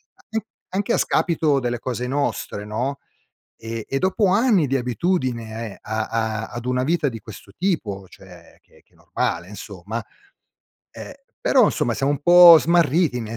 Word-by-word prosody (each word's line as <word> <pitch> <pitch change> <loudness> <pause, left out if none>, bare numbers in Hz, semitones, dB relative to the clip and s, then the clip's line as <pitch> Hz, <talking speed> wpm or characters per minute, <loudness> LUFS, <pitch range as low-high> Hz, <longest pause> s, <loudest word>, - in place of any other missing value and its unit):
an 220 -1 -5
anche 215 - -38 0.2
anche 200 +2 -2
a - - +2
scapito 155 -5 +1
delle 120 -1 -2
cose 125 0 -4
nostre, 130 -6 -3
no. 125 +7 -3 0.6
E 115 -1 -7
e 135 - -2
dopo 190 +2 +1
anni 205 - +3
di 135 0 0
abitudine 120 - -3
a 110 +1 -3
a 110 -1 -2
ad 120 0 -8
una 125 0 0
vita 165 +2 0
di 115 -4 -4
questo 105 -2 -13
tipo, 110 - -2
cioè - - -16
che - - -25
che - - -38
è - - -28
normale 85 +1 -3
insomma, 105 +2 -7 0.9
ehm, - - -9 0.3
però 260 -4 +4
insomma 120 - 0
siamo 135 +3 0
un 145 - -4
po' 175 0 +9
smarriti 165 -4 +2
nel 115 0 -6
125 Hz, 165 wpm, -22 LUFS, 110-170 Hz, 0.9 s, po